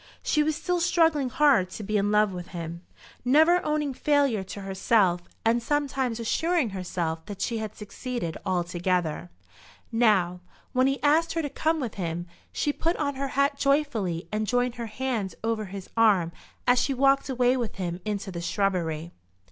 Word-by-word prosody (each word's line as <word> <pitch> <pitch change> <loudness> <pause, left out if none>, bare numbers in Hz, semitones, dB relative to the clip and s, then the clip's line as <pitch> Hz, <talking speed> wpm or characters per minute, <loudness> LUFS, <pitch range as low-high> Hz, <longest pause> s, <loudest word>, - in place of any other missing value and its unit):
She 300 - +2
was 305 0 +1
still 350 +3 -1
struggling 325 -6 +3
hard 260 -9 +4
to 215 - -7
be 215 +2 -2
in 205 0 +2
love 210 -2 +3
with 180 -1 -6
him, 170 -1 -6 0.4
never 315 +8 +5
owning 300 -2 0
failure 280 -7 +2
to 200 +2 -7
herself, 195 -1 +2 0.2
and 230 +1 +3
sometimes 265 -3 -1
assuring 320 - +1
herself 175 -4 -3
that 205 -3 -7
she 230 +3 -1
had 215 -1 -5
succeeded 210 -4 -5
altogether. 175 - -1 0.6
Now, 205 -7 +3 0.3
when 255 0 +3
he 275 +1 -1
asked 320 +3 +3
her 330 -1 -1
to 290 - -3
come 320 0 0
with 245 -6 -3
him, 170 0 -3 0.3
she 290 - 0
put 335 +4 0
on 285 -2 -1
her 275 +1 -3
hat 280 0 +2
joyfully, 235 - 0
and 215 0 -1
joined 245 0 +1
her 230 - -3
hands 220 -5 -3
over 225 -1 -1
his 195 -1 -8
arm 205 -7 +4 0.3
as 245 0 +4
she 275 - 0
walked 275 +1 +3
away 250 -1 +3
with 240 -5 -3
him 180 -2 -4
into 205 -2 -3
the 170 -1 -5
shrubbery. 170 -4 -1
225 Hz, 170 wpm, -26 LUFS, 185-280 Hz, 0.6 s, never